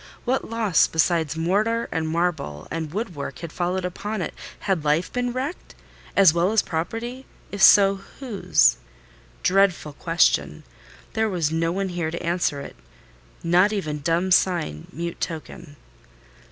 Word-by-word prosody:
What 255 +2 -1
loss, 220 -6 +3
besides 160 -2 +1
mortar 210 +8 +1
and 160 -1 -1
marble 160 - -2
and 160 -2 -4
wood 205 +1 -3
work 140 - -6
had 170 -2 -7
followed 180 +1 -1
upon 205 +4 -4
it? - - -5 0.3
Had 185 -6 0
life 155 +4 +1
been 245 0 -1
wrecked 265 +7 -5 0.4
as 195 -5 +6
well 170 +3 +2
as 220 -2 +3
property? 230 +10 -4 0.2
If 200 - -5
so, 195 -1 +7 0.2
whose? 225 - +2 0.7
Dreadful 185 -5 +2
question: 70 - +1 0.5
there 220 0 +1
was 170 -6 -1
no 165 +1 0
one 195 +1 -2
here 175 -3 -2
to 170 - -5
answer 170 -4 0
it—not - - -2
even 155 -8 -3
dumb 170 +5 0
sign, 170 - +1
mute 170 +4 -5
token. 155 -2 -6
175 Hz, 140 wpm, -23 LUFS, 155-200 Hz, 0.7 s, so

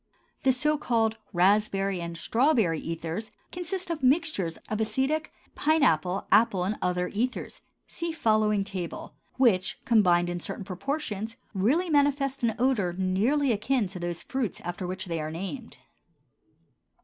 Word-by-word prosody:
The 265 - +4
so 300 +4 +1
called 225 -4 +1
raspberry 195 0 +2
and 170 0 -5
strawberry 225 - +2
ethers 165 +6 -4 0.2
consist 360 0 -3
of 325 - -3
mixtures 260 - +1
of 215 0 -2
acetic, 270 +8 0 0.2
pine 315 0 +2
apple, 180 - +2
apple, 205 -3 +4
and 200 +4 -1
other 180 0 0
ethers 245 +5 -3 0.3
(see 335 -1 -4
following 215 -8 +2
table), 190 -4 -6 0.2
which, 215 -8 +2
combined 180 -6 +4
in 175 0 -3
certain 195 - -5
proportions, 220 - -4 0.2
really 255 - +2
manifest 280 -2 +2
an 225 -2 +2
odor 230 -8 +1
nearly 225 +10 +2
akin 235 +2 +1
to 180 -1 -7
those 175 -1 -4
of - - -32
the - - -19
fruits 260 -8 -1
after 175 +1 -4
which 185 +1 -3
they 165 -3 -3
are 155 - -3
named. 195 - -6
215 Hz, 150 wpm, -27 LUFS, 180-270 Hz, 0.3 s, The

